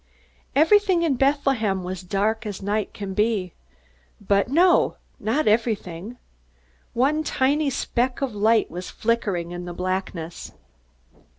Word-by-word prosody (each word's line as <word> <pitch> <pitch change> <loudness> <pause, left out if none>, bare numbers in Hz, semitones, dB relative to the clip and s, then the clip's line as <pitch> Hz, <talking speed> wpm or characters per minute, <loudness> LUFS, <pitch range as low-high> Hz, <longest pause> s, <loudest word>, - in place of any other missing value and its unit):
Everything 370 +3 +4
in 320 -4 +2
Bethlehem 265 -8 +1
was 185 0 -5
dark 205 +5 -1
as 205 -2 -5
night 205 +1 -1
can 200 -2 -6
be. 210 -3 0 0.7
But 200 0 +1
no 345 +7 +3 0.2
not 235 +9 0
everything. 215 -2 -1 0.8
One 285 +6 +2
tiny 290 +1 +1
speck 250 -1 -1
of 270 -4 -2
light 215 +2 +2
was 180 +2 -6
flickering 200 -7 -1
in 175 0 -6
the 175 - -6
blackness. 180 -2 -4
220 Hz, 120 wpm, -23 LUFS, 190-270 Hz, 0.8 s, Everything